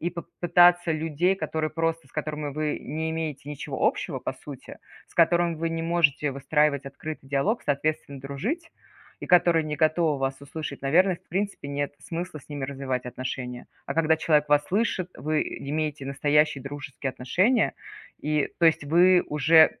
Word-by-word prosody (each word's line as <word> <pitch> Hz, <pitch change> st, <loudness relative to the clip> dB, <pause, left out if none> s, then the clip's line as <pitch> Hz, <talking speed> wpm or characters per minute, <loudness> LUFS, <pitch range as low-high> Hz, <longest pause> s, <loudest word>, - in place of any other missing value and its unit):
И 170 Hz, -, 0 dB
поп 170 Hz, 0 st, -7 dB, 0.2 s
пытаться 175 Hz, -1 st, +5 dB
людей, 160 Hz, +4 st, +1 dB
которые 160 Hz, -4 st, -2 dB
просто, 165 Hz, -2 st, -2 dB
с -, -, -26 dB
которыми 150 Hz, -2 st, -4 dB
вы 155 Hz, 0 st, -1 dB
не 160 Hz, +2 st, -3 dB
имеете 155 Hz, -3 st, -4 dB
ничего 145 Hz, -, -2 dB
общего -, -, -1 dB
по -, -, -4 dB
сути, -, -, -11 dB, 0.3 s
с -, -, -23 dB
которыми 170 Hz, 0 st, +3 dB
вы 165 Hz, +1 st, -1 dB
не 165 Hz, 0 st, -3 dB
можете 165 Hz, -4 st, +2 dB
выстраивать 140 Hz, +1 st, +1 dB
открытый 140 Hz, 0 st, -7 dB
диалог, 150 Hz, -, +1 dB
соответственно, 145 Hz, -1 st, -1 dB
дружить, 220 Hz, -, -4 dB, 0.5 s
и -, -, -6 dB
которые 175 Hz, -2 st, +5 dB
не 150 Hz, 0 st, -3 dB
готовы 155 Hz, -1 st, +2 dB
вас 135 Hz, 0 st, -2 dB
услышать, 140 Hz, 0 st, -6 dB
наверно, 175 Hz, +7 st, +3 dB
в -, -, -30 dB
принципе 195 Hz, -5 st, -3 dB
нет 140 Hz, 0 st, -2 dB
смысла 170 Hz, -1 st, -5 dB
с -, -, -22 dB
ними 145 Hz, -2 st, -4 dB
развивать 130 Hz, -2 st, -3 dB
отношения. 125 Hz, 0 st, -5 dB, 0.2 s
А -, -, -3 dB
когда 160 Hz, 0 st, +3 dB
человек 150 Hz, -2 st, +2 dB
вас 145 Hz, 0 st, +4 dB
слышит, 190 Hz, -3 st, 0 dB
вы 150 Hz, +4 st, 0 dB
имеете 150 Hz, -1 st, -3 dB
настоящие 145 Hz, 0 st, +2 dB
дружеские 145 Hz, -1 st, -5 dB
отношения, 185 Hz, -, +1 dB, 0.5 s
и 150 Hz, -1 st, +1 dB
то 170 Hz, -, +2 dB
есть, 160 Hz, -2 st, +3 dB
вы 175 Hz, +4 st, +5 dB
уже 155 Hz, +2 st, +5 dB
155 Hz, 165 wpm, -26 LUFS, 140-170 Hz, 0.5 s, пытаться